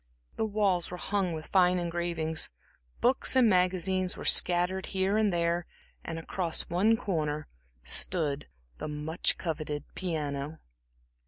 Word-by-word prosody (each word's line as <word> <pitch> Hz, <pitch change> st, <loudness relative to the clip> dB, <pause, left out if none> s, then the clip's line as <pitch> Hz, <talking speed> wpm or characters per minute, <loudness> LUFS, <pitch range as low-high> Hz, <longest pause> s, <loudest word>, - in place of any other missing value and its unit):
The 220 Hz, -, 0 dB
walls 200 Hz, -4 st, +1 dB
were 180 Hz, -, -6 dB
hung 195 Hz, -1 st, -1 dB
with 155 Hz, 0 st, -6 dB
fine 180 Hz, -1 st, +3 dB
engravings, 170 Hz, -2 st, -1 dB, 0.5 s
books 255 Hz, +1 st, +3 dB
and 255 Hz, -3 st, +6 dB
magazines 185 Hz, -1 st, +2 dB
were -, -, -7 dB
scattered 180 Hz, +2 st, +3 dB
here 190 Hz, +2 st, +2 dB
and 215 Hz, -2 st, +3 dB
there. 170 Hz, 0 st, 0 dB, 0.4 s
Across 165 Hz, +1 st, -2 dB
one 210 Hz, +6 st, +3 dB
corner 155 Hz, -9 st, -2 dB, 0.4 s
stood 145 Hz, -, 0 dB, 0.3 s
the -, -, -4 dB
much 150 Hz, +3 st, 0 dB
coveted 155 Hz, -3 st, -3 dB
piano. 150 Hz, -4 st, -3 dB
175 Hz, 120 wpm, -29 LUFS, 160-190 Hz, 0.5 s, and